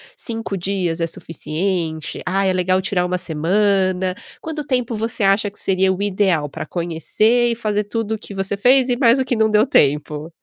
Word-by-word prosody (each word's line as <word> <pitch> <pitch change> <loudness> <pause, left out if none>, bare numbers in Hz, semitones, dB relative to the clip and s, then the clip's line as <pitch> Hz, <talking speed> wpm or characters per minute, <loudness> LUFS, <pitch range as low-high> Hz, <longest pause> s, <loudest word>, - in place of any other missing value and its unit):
5 225 -4 -4
dias 175 -2 -2
é 165 - 0
suficiente". 165 0 -3
"Ah, 195 +2 0
é 190 - +3
legal 185 +1 +1
tirar 185 -2 0
1 180 0 -1
semana."? 185 +2 +1 0.3
Quanto 310 -2 -5
tempo 250 -3 -1
você 225 0 -1
acha 200 +2 +3
que 200 - -10
seria 190 0 +2
o 190 - -5
ideal 185 -7 +1
pra - - -6
conhecer 185 +9 +1
e - - -1
fazer 210 -2 -1
tudo 220 +1 -2
o - - -9
que 205 - -8
você 195 +1 -2
fez 255 +4 +4
e 245 - +1
mais 245 0 +4
o 260 - 0
que 245 -2 -1
não 220 0 +3
deu 215 +1 +4
tempo? 150 - +1
195 Hz, 195 wpm, -20 LUFS, 180-220 Hz, 0.3 s, fez